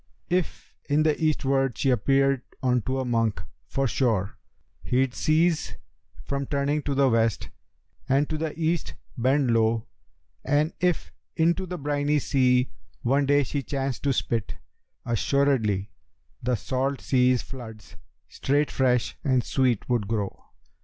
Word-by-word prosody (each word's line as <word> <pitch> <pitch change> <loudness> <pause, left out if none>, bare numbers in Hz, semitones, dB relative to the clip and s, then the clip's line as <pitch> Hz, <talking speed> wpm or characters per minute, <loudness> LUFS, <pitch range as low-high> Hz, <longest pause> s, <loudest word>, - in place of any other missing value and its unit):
If 180 -1 -2 0.2
in 150 +2 +3
the 155 -1 +3
Eastward 135 -4 +1
she 135 - +2
appeared 135 +3 +2 0.2
unto 125 0 +1
a 130 - -2
monk, 115 -3 0 0.3
for 135 0 0
sure, 110 -5 0 0.5
He'd 130 0 +1
cease 160 +3 +1 0.5
from 140 -1 -3
turning 145 +1 0
to 145 -1 -2
the 140 0 +4
West 115 -3 +1 0.6
and 140 +3 +3
to 155 - -3
the 155 0 -4
East 165 +1 -1 0.2
bend 130 +1 +2
low; 115 0 +2 0.6
And 150 +3 +1
if 180 -1 0 0.2
into 170 +3 +1
the 180 0 -4
briny 145 0 0
sea 125 -2 +2 0.3
one 135 +3 +2
day 145 0 +4
she 140 +2 -3
chanced 135 -1 -3
to 140 - +1
spit, 115 -4 -1 0.5
Assuredly 115 -5 +1 0.5
the 125 +1 0
salt 130 +5 -2
sea's 125 -1 +2
floods 110 -5 -10 0.3
straight 145 +2 0
fresh 125 -3 +1
and 130 -4 +2
sweet 125 -5 0
would 120 -5 0
grow.' 105 -3 -3
135 Hz, 135 wpm, -26 LUFS, 120-145 Hz, 0.6 s, the